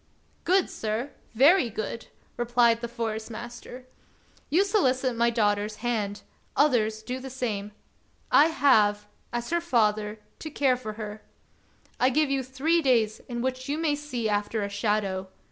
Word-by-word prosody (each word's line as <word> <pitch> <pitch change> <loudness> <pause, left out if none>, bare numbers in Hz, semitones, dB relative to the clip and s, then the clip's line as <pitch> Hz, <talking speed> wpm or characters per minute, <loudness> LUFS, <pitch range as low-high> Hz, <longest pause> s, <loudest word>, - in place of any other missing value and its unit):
"Good, 370 +1 +3
sir; 225 +6 -3 0.2
very 280 - +5
good!" 220 +2 -5 0.3
replied 240 -1 +2
the 235 - -3
Forest 225 -2 -4
master. 240 +2 -9 0.6
"You 345 +7 +4
solicit 260 - +1
my 235 +1 +3
daughter's 210 -2 0
hand; 210 -4 -2 0.3
others 220 -6 +2
do 250 +3 -4
the 265 +1 -7
same. 215 -6 -3 0.6
I 300 - +7
have, 220 -9 +3 0.3
as 240 +3 -4
her 340 0 +1
father, 215 -8 +1 0.2
to 315 - -6
care 275 -3 +2
for 220 -4 -6
her. 215 0 -7 0.8
I 255 - +4
give 295 +2 +1
you 275 -1 +1
three 270 +7 +1
days 230 -6 +2
in 240 -1 -3
which 260 +1 -3
you 290 - 0
may 320 -2 +1
see 285 -6 -3
after 210 +1 -1
a 200 - -3
shadow. 200 -2 -1
240 Hz, 150 wpm, -27 LUFS, 215-270 Hz, 0.8 s, I